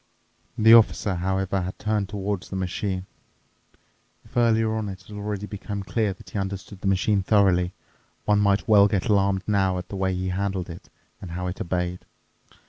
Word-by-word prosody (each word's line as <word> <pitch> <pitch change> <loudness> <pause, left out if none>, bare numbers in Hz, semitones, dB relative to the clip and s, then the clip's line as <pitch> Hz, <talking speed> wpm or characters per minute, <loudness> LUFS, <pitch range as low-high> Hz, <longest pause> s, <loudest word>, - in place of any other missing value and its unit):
The 110 +1 +7
Officer, 110 -3 +5
however, 95 +1 -1
had 90 +1 -5
turned 105 -2 -1
towards 100 -2 -3
the - - -5
machine. 95 0 -2 1.2
If - - -20
earlier 115 -2 +3
on 110 -2 -2
it 95 0 -8
had 105 - -11
already 105 0 -4
become 100 -1 -5
clear 110 +1 0
that 95 - -12
he 105 - -2
understood 95 0 -5
the - - -2
machine 95 +1 +2
thoroughly, 95 -3 +3 0.5
one 105 -1 +3
might 100 -1 +2
well 100 -2 +7
get 100 -2 -1
alarmed 100 -2 +2
now 95 -3 +1
at 90 0 -6
the - - -6
way 95 -1 0
he 95 +1 -2
handled 95 -1 -2
it 85 - -11 0.3
and 95 - -7
how 90 +2 -4
it 90 +1 -4
obeyed. 90 0 -2
100 Hz, 180 wpm, -25 LUFS, 95-105 Hz, 1.2 s, The